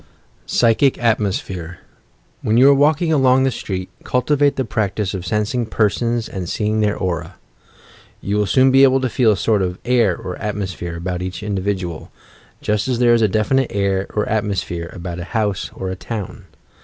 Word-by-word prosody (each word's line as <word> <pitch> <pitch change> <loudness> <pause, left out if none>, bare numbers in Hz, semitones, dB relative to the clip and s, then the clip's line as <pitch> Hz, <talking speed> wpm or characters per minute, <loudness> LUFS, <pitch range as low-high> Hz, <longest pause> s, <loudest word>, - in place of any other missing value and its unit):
PSYCHIC 120 +3 +3
ATMOSPHEHE 95 -6 -1 0.6
When 110 +2 +1
you 130 +3 +7
are - - +7
walking 155 +4 +2
along 130 -2 +4
the 135 - +2
street, 95 -5 -5
cultivate 140 +3 +1
the 130 - -1
practice 105 -2 -2
of 90 -2 -5
sensing 105 +6 0
persons, 115 +2 0
and 90 -3 -5
seeing 110 0 -1
their 105 -1 +1
aura. 85 -2 -3 0.8
You 100 +1 -2
will 105 -1 +1
soon 130 +3 +4
be 135 +1 +5
able 135 -1 +5
to 130 - 0
feel 115 -3 +3
a - - -3
sort 105 0 +1
of 90 -1 -2
air 115 -7 +2
or 90 -1 -6
atmosphere 95 -5 -4
about 90 +1 -4
each 90 +2 -5
individual 95 -4 -3 0.2
— - - -29
just 105 +2 0
as 125 -2 0
there 120 -1 +4
is 115 - +3
a 110 - +4
definite 115 +6 +1
air 100 -1 0
or 105 - 0
at 110 -1 0
mosphere 90 -4 -3
about 90 -1 -6
a - - -4
house 105 -3 -1
or 95 -1 -4
a - - -4
town. 105 +1 -6
105 Hz, 185 wpm, -19 LUFS, 95-120 Hz, 0.8 s, you